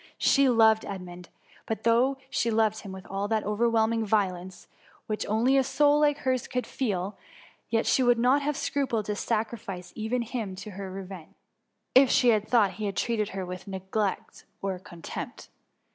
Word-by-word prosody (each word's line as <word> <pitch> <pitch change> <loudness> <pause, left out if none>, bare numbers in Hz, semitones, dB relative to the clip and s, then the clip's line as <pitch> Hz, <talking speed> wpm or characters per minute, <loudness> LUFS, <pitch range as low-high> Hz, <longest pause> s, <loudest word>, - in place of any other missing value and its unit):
She 275 -1 +4
loved 220 -2 +5
Edmund, 180 -3 -8 0.4
but 220 - -3
though 245 +4 +3
Bhe 230 - +1
loved 220 -1 +2
him 200 - -9
with 190 0 -9
all 195 +1 -3
that 220 0 0
overwhelming 225 +1 +1
violence^ 190 -4 -1 0.4
which 215 -1 -3
only 235 +6 +3
a 270 - +4
soul 290 +2 +3
like 295 -1 +3
hers 255 -3 -1
could 250 -1 -2
feel, 200 -6 -3 0.5
yet 225 -1 +1
she - - +3
would 245 -1 +4
not 255 +5 +3
have 295 0 -1
scrupled 240 -7 -1
to 210 - -2
sacrifice 205 -5 -3
even 230 +3 -1
him 220 -5 -4
to 190 +3 -8
her 195 0 -7
revenge, 190 -3 -9 0.6
if 260 0 +7
she 250 -3 +4
had 215 -2 +2
thought 220 -6 +4
he 205 +2 -3
treated 215 +1 -1
her 190 -1 -4
with 180 +2 -8
negligence 195 +1 -3 0.2
or 195 -2 -3
contempt. 175 -2 -8
220 Hz, 170 wpm, -27 LUFS, 195-240 Hz, 0.6 s, if